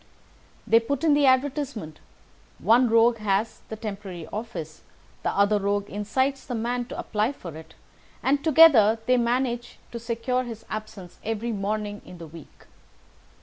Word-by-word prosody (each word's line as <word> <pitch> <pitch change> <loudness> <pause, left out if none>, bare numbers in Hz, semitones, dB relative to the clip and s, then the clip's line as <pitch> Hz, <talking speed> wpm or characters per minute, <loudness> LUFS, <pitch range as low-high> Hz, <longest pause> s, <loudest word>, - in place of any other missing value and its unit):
They 225 - +5
put 280 +7 -3
in 315 -3 +5
the 290 -1 +4
advertisement, 260 - 0 0.6
one 240 +2 +4
rogue 230 +1 +4
has 210 +1 -1
the 220 - -4
temporary 195 -6 -7
office, 185 -8 -6 0.4
the - - 0
other 200 +1 +2
rogue 200 0 -1
incites 260 +7 -1
the 245 - -5
man 240 +2 -2
to - - -8
apply 215 +5 -1
for 170 - -9
it, 160 0 -12 0.5
and 280 +1 +2
together 280 -9 +7
they 255 +1 +3
manage 240 0 -1
to 235 - -5
secure 235 +2 -1
his 230 -3 -8
absence 215 -4 -7
every 225 +2 -2
morning 205 0 -3
in 180 - -12
the 170 - -9
week. 160 -1 -14
225 Hz, 150 wpm, -25 LUFS, 205-250 Hz, 0.6 s, together